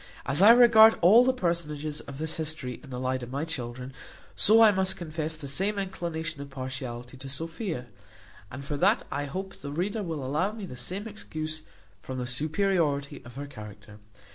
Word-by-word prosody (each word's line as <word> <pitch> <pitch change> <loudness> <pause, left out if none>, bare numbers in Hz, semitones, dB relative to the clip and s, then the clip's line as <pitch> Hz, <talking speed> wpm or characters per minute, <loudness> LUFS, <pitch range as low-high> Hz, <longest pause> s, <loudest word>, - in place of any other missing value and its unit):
As 140 +5 +1
I 205 - +9
regard 230 -2 +8
all 210 +8 +8
the 260 - +4
personages 155 - -2
of 140 -1 -9
this 160 +1 -4
history 155 -6 -3
in 140 - -12
the 125 -1 -5
light 130 0 -1
of 120 - -7
my 140 +4 -2
children; 125 -3 -6 0.4
so 220 +2 +5
I 215 - +8
must 190 -1 0
confess 160 -2 -4
the 145 -3 -7
same 195 +10 0
inclination 165 -5 -4
of 140 - -8
partiality 130 -2 -6
to 135 +1 -9
Sophia; 160 - -4 0.6
and 135 +5 -8
for 145 -1 -3
that 200 +8 +3
I 145 - -2
hope 190 +7 -6
the 140 - -6
reader 195 +8 -2
will 160 -8 -4
allow 155 +10 0
me 215 -3 -6
the 130 - -8
same 185 - -4
excuse, 155 -7 -5 0.4
from 130 - -6
the 125 - -2
superiority 150 +1 0
of 125 0 -13
her 140 +1 -5
character. 105 -5 -11
155 Hz, 190 wpm, -28 LUFS, 130-190 Hz, 0.6 s, I